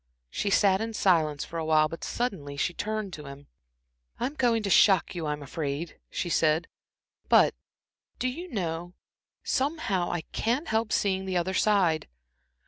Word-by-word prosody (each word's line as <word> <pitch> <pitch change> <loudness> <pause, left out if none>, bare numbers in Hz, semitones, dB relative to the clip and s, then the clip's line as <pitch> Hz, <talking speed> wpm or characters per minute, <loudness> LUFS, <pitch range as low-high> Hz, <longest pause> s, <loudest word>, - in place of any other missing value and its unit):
She 205 - -1
sat 195 0 +4
in 225 0 -3
silence 155 -8 +2
for 165 - -5
awhile, 155 -1 +3
but 165 +1 -8
suddenly 155 - -3
she 175 - 0
turned 215 -1 -3
to 150 -3 -8
him. 140 +1 -10 0.7
"I'm 275 - -1
going 235 -6 +1
to 200 - -1
shock 195 -2 +5
you, 170 -4 -4
I'm 150 0 -3
afraid," 145 +2 -4
she - - -3
said, 160 -1 +2 0.6
"but - - +6 0.6
do 255 - -1
you 340 +9 -5
know 175 - -3 0.5
somehow 260 - 0
I 175 - -2
can't 250 - -2
help 220 0 0
seeing 190 -1 +1
the 185 -1 0
other 180 +2 -1
side. 185 -6 +2
185 Hz, 155 wpm, -28 LUFS, 160-215 Hz, 0.7 s, but